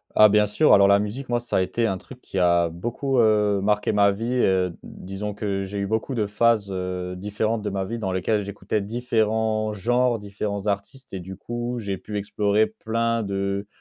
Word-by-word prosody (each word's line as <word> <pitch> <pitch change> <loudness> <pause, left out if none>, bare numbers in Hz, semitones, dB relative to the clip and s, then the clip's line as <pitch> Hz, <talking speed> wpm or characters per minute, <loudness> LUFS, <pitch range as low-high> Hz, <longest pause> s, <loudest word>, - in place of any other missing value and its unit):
Ah 110 - +8
bien 105 0 +4
sûr, 130 +10 +4
alors 100 0 +6
la 100 0 +6
musique 120 +6 -4
moi 120 0 +1
ça 120 - -2
a - - +3
été 115 +5 0
un 95 -3 -1
truc 125 +6 -13
qui 95 - -7
a 85 -1 +4
beaucoup, 120 - -2
heu, 105 -3 +3
marqué 105 +1 +1
ma 100 -1 +4
vie, 110 +4 -4 0.2
heu, 90 -2 +2
disons 95 +3 -6
que 100 -1 -2
j'ai 100 +1 -6
eu 100 0 -1
beaucoup 110 +5 -2
de 110 -3 +1
phases, 105 -1 +2
heu, 90 -1 -4
différentes 105 +3 -2
de 105 - -2
ma 95 -1 -2
vie 115 +4 -4
dans 95 -4 -2
lesquelles, 100 +3 0
j'écoutais 100 +1 -3
différents 110 -1 0
genres, 120 +3 +1
différents 100 0 -4
artistes 105 +6 -4
et 95 - -4
du 95 +1 -9
coup 120 +3 -4
j'ai 100 -3 -3
pu 105 +2 -6
explorer 105 +1 +1
plein 115 +1 -1
de 100 0 -2
105 Hz, 205 wpm, -24 LUFS, 100-115 Hz, 0.2 s, Ah